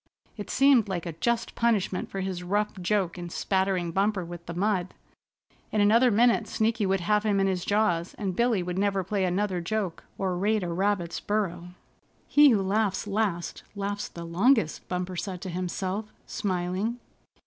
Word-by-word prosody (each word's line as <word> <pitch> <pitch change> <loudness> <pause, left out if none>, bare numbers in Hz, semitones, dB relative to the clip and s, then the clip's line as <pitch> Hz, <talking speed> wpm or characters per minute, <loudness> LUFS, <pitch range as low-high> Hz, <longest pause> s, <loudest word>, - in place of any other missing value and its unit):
It 205 - -7
seemed 270 -6 +4
like 180 -3 -3
a 170 - -4
just 235 +8 -1
punishment 215 -5 0
for 195 - -4
his 185 -2 -3
rough 205 +4 0
joke 185 -1 0
in 175 0 -6
spattering 190 -1 0
Bumper 195 0 0
with 175 0 -8
the 170 - -5
mud. 190 -1 0 0.8
In 215 - 0
another 225 +5 +5
minute 230 0 +3
Sneaky 220 -2 0
would 190 -1 +1
have 210 +4 +2
him 205 -2 +2
in 195 - +3
his 185 -2 0
jaws, 190 -5 +1
and 195 -4 -3
Billy 235 -5 +2
would 180 +1 -3
never 195 -1 +1
play 190 +1 0
another 185 0 0
joke 190 -1 -3
or 190 -2 -1
raid 210 +3 +1
a 175 - -3
rabbit's 180 -1 0
burrow. 180 -4 -2 0.5
"He 295 0 +7
who 210 -6 +3
laughs 200 +1 0
last 200 -4 -1
laughs 205 +1 -3
the 170 - -8
longest," 195 - +2
Bumper 180 0 -3
said 180 +1 -4
to 190 - -5
himself, 185 +4 -3
smiling. 190 +4 -2
195 Hz, 170 wpm, -27 LUFS, 180-210 Hz, 0.8 s, He